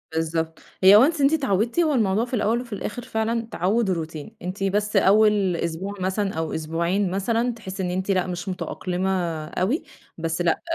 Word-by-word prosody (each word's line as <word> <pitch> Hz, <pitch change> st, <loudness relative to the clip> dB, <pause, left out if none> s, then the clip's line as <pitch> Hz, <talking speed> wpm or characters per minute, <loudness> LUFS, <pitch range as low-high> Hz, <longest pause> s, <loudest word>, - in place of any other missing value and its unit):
بالضبط، 160 Hz, 0 st, -1 dB, 0.2 s
هي 195 Hz, +2 st, +9 dB
once 295 Hz, +5 st, +3 dB
أنتِ 280 Hz, +2 st, +4 dB
اتعودتِ، 240 Hz, -, +1 dB
هو 320 Hz, -3 st, +3 dB
الموضوع 215 Hz, -2 st, +2 dB
في 245 Hz, -, -13 dB
الأول 230 Hz, +1 st, +1 dB
وفي 240 Hz, -3 st, -9 dB
الآخر 210 Hz, +3 st, -4 dB
فعلًا 225 Hz, +1 st, -1 dB
تعوُّد 200 Hz, +5 st, +1 dB
و -, -, +3 dB
روتين، 160 Hz, +4 st, -6 dB
أنتِ 185 Hz, +3 st, -4 dB
بس 210 Hz, +2 st, 0 dB
أول 200 Hz, -1 st, +4 dB
أسبوع 170 Hz, +4 st, -3 dB
مثلًا 190 Hz, +2 st, -1 dB
أو 160 Hz, 0 st, -3 dB
أسبوعين 170 Hz, +5 st, -1 dB
مثلًا 230 Hz, +5 st, 0 dB
تحسي 195 Hz, -4 st, -6 dB
إن 180 Hz, -, -1 dB
أنتِ 185 Hz, +2 st, -1 dB
لأ 185 Hz, -1 st, +1 dB
مش 180 Hz, +1 st, -4 dB
متأقلمة 180 Hz, +1 st, -3 dB, 0.4 s
اوي، 210 Hz, -, -1 dB, 0.3 s
بس 165 Hz, +1 st, -2 dB
لأ 170 Hz, -2 st, +1 dB
195 Hz, 180 wpm, -24 LUFS, 175-225 Hz, 0.4 s, هي